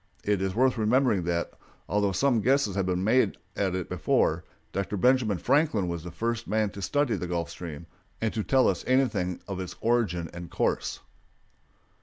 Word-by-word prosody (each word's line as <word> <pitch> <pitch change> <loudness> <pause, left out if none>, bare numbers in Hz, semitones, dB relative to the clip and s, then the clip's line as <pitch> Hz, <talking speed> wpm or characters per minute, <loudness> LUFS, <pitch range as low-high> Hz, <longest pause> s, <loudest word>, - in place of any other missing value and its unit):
It 100 -2 +1
is 95 0 -1
worth 130 0 +2
remembering 110 -4 +2
that, 85 0 -1 0.4
although 100 +1 +1
some 120 +4 +2
guesses 130 -3 +2
had 95 -2 0
been 90 0 0
made 110 0 +3 0.2
at 95 -2 0
it 90 -2 -3
before, - - +1 0.3
Dr. 100 +1 -2
Benjamin 120 -2 +3
Franklin 140 - +2
was 85 -2 -4
the 90 - -6
first 115 +6 -3
man 110 -1 +1
to 100 -1 -8
study 145 +4 +1
the 90 - -4
Gulf 85 -3 -2
Stream 85 -2 -7 0.3
and 110 -1 -1
to 110 - -1
tell 130 +3 +3
us - - 0
anything 120 -9 +1
of 95 -2 -4
its 90 -1 -5
origin 110 -8 +1
and 85 0 -8
course. - - -1
100 Hz, 180 wpm, -27 LUFS, 90-120 Hz, 0.4 s, made